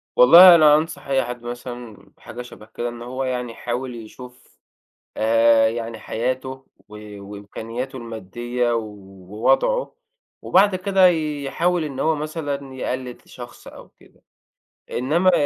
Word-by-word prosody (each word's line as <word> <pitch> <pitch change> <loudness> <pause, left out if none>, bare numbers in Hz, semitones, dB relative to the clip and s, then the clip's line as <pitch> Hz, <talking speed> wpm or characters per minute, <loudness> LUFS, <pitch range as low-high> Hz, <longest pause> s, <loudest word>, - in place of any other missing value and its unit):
والله 170 +7 +9
أنا 150 -2 +6
أنصح 155 -1 -3
أي 135 -1 +1
حد 120 0 -7
مثلًا 120 -2 -8
حاجة 120 - -9
شبه 120 -3 -12
كده، 120 +2 -5
إن 120 0 -10
هو 130 +2 -5
يعني 125 -2 -3
يحاول 120 +2 -5
يشوف 125 +3 -13 0.6
آآ 115 0 +4
يعني 115 -1 -5
حياته 130 +4 -3 0.4
و 105 -1 -11
وإمكانياته 110 +6 -7
المادّية 120 +2 -4
ووضعه 105 - -2 0.5
وبعد 195 +1 +3
كده 190 0 +3
يحاول 160 +1 -1
إن 135 -3 -6
هو 160 0 +1
مثلًا 145 -3 -5
يقلِّد 130 -1 -5
شخص 120 -1 -12
أو - - -13
كده، - - -25 0.7
إنما 165 +9 +2
125 Hz, 125 wpm, -21 LUFS, 115-150 Hz, 0.7 s, والله